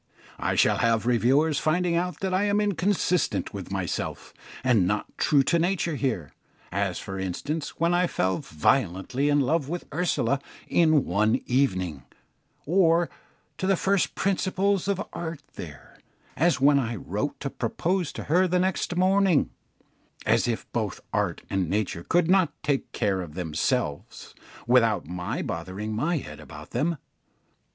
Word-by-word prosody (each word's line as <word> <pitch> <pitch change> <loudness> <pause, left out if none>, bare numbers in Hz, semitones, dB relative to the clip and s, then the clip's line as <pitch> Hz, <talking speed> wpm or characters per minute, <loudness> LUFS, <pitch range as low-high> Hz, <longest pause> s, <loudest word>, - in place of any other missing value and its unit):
I - - 0
shall - - +4
have 115 -1 +2
reviewers 135 +6 +3
finding 175 +2 +1
out 180 +1 -2
that 190 -1 -1
I 190 +2 +2
am 205 0 +2
inconsistent 200 -3 0
with - - -6
myself, - - -3 0.3
and 115 -8 +3
not 105 +2 -2
true 140 -2 +4
to 170 +5 +2
nature 170 -1 0
here 125 - -2 0.4
as, - - -1
for 95 0 -6
instance, 145 - -4
when 170 +1 +2
I 180 0 +3
fell 95 - 0
violently 95 - 0
in 145 0 +4
love 145 +1 0
with 175 +1 -4
Ursula 140 -6 +1 0.3
in 155 -4 +3
one 105 +5 +2
evening; 95 - 0 0.6
or 170 0 +3 0.5
to 190 - -1
the 195 -2 +3
first 195 +1 +1
principles 195 0 0
of 200 0 -1
art 160 -3 -5
there 70 -6 -10 0.4
as 170 +2 +2
when 140 +1 +5
I 120 -3 -2
wrote 105 +8 -3
to 140 - -3
propose 170 - -1
to - - -6
her 180 +5 +3
next 180 0 0
morning: 185 -3 +3 0.7
as 115 +2 +3
if 115 -2 -2
both 110 -5 -2
art - - -1
and 95 -4 -1
nature 100 -4 -1
could 175 - +2
not 185 -3 +4
take 140 -2 -1
care 100 -4 0
of 80 -4 -8
themselves 75 -4 -2 0.3
without 115 -3 +3
my 90 +2 -4
bothering 105 +4 -4
my 155 +9 0
head 75 - -7
about - - -11
them. 155 +7 0
145 Hz, 150 wpm, -26 LUFS, 105-175 Hz, 0.7 s, when